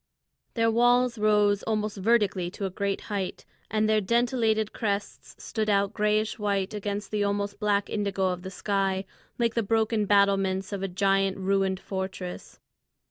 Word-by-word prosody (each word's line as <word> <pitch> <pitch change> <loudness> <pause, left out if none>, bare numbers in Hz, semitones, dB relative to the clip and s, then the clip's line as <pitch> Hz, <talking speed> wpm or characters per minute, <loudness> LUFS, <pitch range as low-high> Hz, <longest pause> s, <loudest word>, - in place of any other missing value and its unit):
The 230 -1 +3
walls 245 0 +3
rose 210 -1 +3
almost 215 -1 -2
vertically 200 -4 +2
to 195 +2 -5
a 190 - -3
great 200 +1 -2
height, 200 -3 -4 0.2
and 215 0 +1
their 215 0 +3
dentelated 225 -1 +1
crests 205 -2 -3
stood 215 -2 -3
out 200 0 +2
grayish 215 +1 0
white 200 -2 -1
against 205 0 -4
the 210 -1 0
almost 200 0 -2
black 205 -1 +1
indigo 200 -3 -1
of 180 -1 -3
the 190 - -6
sky, 195 0 -1 0.3
like 235 -2 +1
the 230 - +1
broken 220 0 +1
battlements 195 -1 +2
of 200 - -3
a 195 - -1
giant 195 +1 +1
ruined 190 0 0
fortress. 190 -2 -6
205 Hz, 155 wpm, -27 LUFS, 195-215 Hz, 0.3 s, The